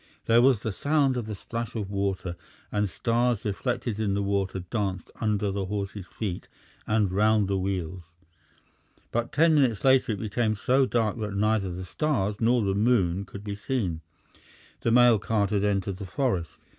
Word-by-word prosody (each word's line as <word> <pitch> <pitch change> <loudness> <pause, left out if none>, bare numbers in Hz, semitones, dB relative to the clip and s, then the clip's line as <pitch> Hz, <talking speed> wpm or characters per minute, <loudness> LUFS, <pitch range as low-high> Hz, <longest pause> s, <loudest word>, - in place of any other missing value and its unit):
There 115 +1 +5
was 125 -4 +4
the 110 - -2
sound 140 +3 +1
of 120 -3 -3
the 105 - -4
splash 115 +4 -5
of 100 -3 -3
water, 95 -3 -2 0.4
and 105 -1 0
stars 120 +3 0
reflected 110 +1 -2
in 100 -3 0
the 100 - 0
water 100 -1 -1
danced 95 -1 -3
under 105 -2 0
the 95 0 -2
horses' 100 -1 -4
feet 95 -3 -5 0.4
and 105 -3 +2
round 105 +1 +3
the 95 0 0
wheels. 95 -2 -3 1.1
But 120 0 -1
ten 165 +2 +4
minutes 130 -8 +2
later 130 -4 +4
it 100 - -5
became 110 +1 0
so 130 +5 +2
dark 115 -2 0
that 105 -2 -3
neither 105 -2 +1
the 90 +1 -6
stars 105 - -1
nor 120 0 +3
the 100 -1 +1
moon 100 -4 +2
could 100 +1 -10
be 105 -1 -4
seen. 100 - -2 0.8
The - - 0
mail 120 -2 +6
cart 105 -1 0
had 100 -1 +1
entered 100 -2 0
the 100 -1 -7
forest. 95 - -1
105 Hz, 175 wpm, -27 LUFS, 100-120 Hz, 1.1 s, mail